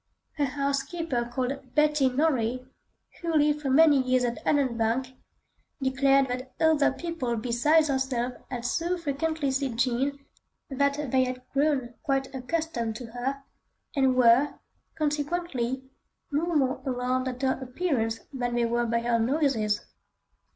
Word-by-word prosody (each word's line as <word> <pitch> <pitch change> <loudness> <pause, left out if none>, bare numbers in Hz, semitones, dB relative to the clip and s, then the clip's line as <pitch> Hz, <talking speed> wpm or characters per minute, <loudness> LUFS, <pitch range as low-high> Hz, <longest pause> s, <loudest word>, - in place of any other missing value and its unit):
A 290 - +3
housekeeper 275 -1 -2
called 260 +1 -4
Betty 300 -3 +4
Norrie, 255 -3 0 0.6
who 335 -2 -1
lived 300 0 +3
for 275 - -2
many 290 0 +6
years 255 0 +2
at 240 -1 -2
Allanbank, 255 -2 +1 0.7
declared 270 0 +3
that 255 +1 -5
other 315 -3 +4
people 270 -5 -3
besides 255 +8 +3
herself 265 -3 -1 0.2
had 245 -2 -5
so 340 +8 0
frequently 315 -2 -1
seen 265 -3 -1
Jean 255 +3 +1 0.5
that 280 0 0
they 260 -1 +4
had 255 0 -5
grown 275 -4 +1
quite 270 -1 -1
accustomed 260 -4 -2
to 230 0 -8
her, 265 +3 -3 0.5
and 265 -2 +3
were, 250 +3 +5 0.4
consequently, 290 -4 -1 0.5
no 300 +4 0
more 265 -2 +1
alarmed 255 -1 -1
at 255 +1 -5
her 260 -1 +1
appearance 250 -5 -1
than 245 -2 -2
they 240 -1 +2
were 235 +1 0
by 230 0 +1
her 235 0 +1
noises. 230 -5 +1
265 Hz, 135 wpm, -27 LUFS, 245-290 Hz, 0.7 s, many